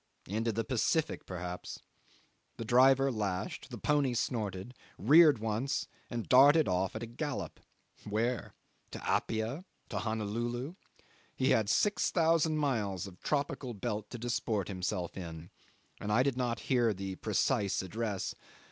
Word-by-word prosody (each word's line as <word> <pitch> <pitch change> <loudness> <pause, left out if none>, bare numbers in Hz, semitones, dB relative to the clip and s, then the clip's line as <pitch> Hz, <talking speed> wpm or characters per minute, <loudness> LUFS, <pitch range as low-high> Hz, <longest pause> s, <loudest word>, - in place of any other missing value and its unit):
Into 110 +4 -1
the 115 +2 -1
Pacific, 130 +7 0
perhaps. 90 -1 -5 0.8
The 115 - -5
driver 135 +3 +5
lashed; 100 -5 -3
the - - -7
pony 145 -4 +1
snorted, 105 -2 -2 0.2
reared 150 - +7
once, 110 +5 -1 0.2
and 120 -2 -4
darted 145 +5 +7
off 95 +1 0
at 110 - -4
a - - -2
gallop. 135 +5 -5 0.5
Where? 115 +3 -1 0.4
To - - -6
Apia? 115 +9 -1 0.3
To - - -2
Honolulu? 120 +6 -2 0.6
He 130 - +2
had 110 -2 +3
6000 165 - +2
miles 105 - -1
of 90 -2 -12
tropical 140 -4 -2
belt 105 0 -3
to 120 - -6
disport 115 -4 -1
himself 90 -2 -3
in, 85 -2 -8 0.5
and 105 - -3
I 120 +4 +4
did 135 -2 0
not 125 -2 -1
hear 120 -5 +2
the 95 0 -4
precise 100 -2 +1
address. 105 0 -3
115 Hz, 135 wpm, -32 LUFS, 100-130 Hz, 0.8 s, reared